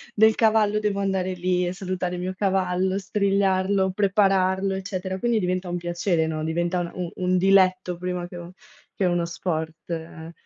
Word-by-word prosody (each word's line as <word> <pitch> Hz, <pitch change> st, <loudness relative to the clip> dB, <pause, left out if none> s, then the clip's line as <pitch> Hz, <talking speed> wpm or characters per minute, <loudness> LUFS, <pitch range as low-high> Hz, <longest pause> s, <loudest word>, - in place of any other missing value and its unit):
del 220 Hz, +1 st, +6 dB
cavallo 215 Hz, -2 st, +3 dB
devo 205 Hz, -2 st, -1 dB
andare 190 Hz, -1 st, -1 dB
lì 180 Hz, 0 st, 0 dB
e 180 Hz, -, -2 dB
salutare 185 Hz, -1 st, -3 dB
il 175 Hz, -, -5 dB
mio 185 Hz, +1 st, -3 dB
cavallo, 190 Hz, -1 st, +1 dB
strigliarlo, 195 Hz, -1 st, +1 dB
prepararlo, 195 Hz, -1 st, +2 dB
eccetera, 190 Hz, -1 st, -4 dB
quindi 235 Hz, +1 st, +1 dB
diventa 185 Hz, 0 st, -1 dB
un 175 Hz, -, -3 dB
piacere, 175 Hz, -1 st, 0 dB
no, 155 Hz, -1 st, -3 dB
diventa 175 Hz, +2 st, 0 dB
un 175 Hz, -, -3 dB
un 180 Hz, -2 st, -4 dB
un 185 Hz, 0 st, +1 dB
diletto 185 Hz, -1 st, +3 dB
prima 180 Hz, 0 st, -3 dB
che 175 Hz, -, -9 dB
un 175 Hz, 0 st, -8 dB, 0.5 s
che 195 Hz, -, -2 dB
uno 175 Hz, -1 st, +1 dB
sport, 160 Hz, -2 st, -4 dB
eh. 165 Hz, 0 st, -6 dB
185 Hz, 170 wpm, -24 LUFS, 175-195 Hz, 0.5 s, del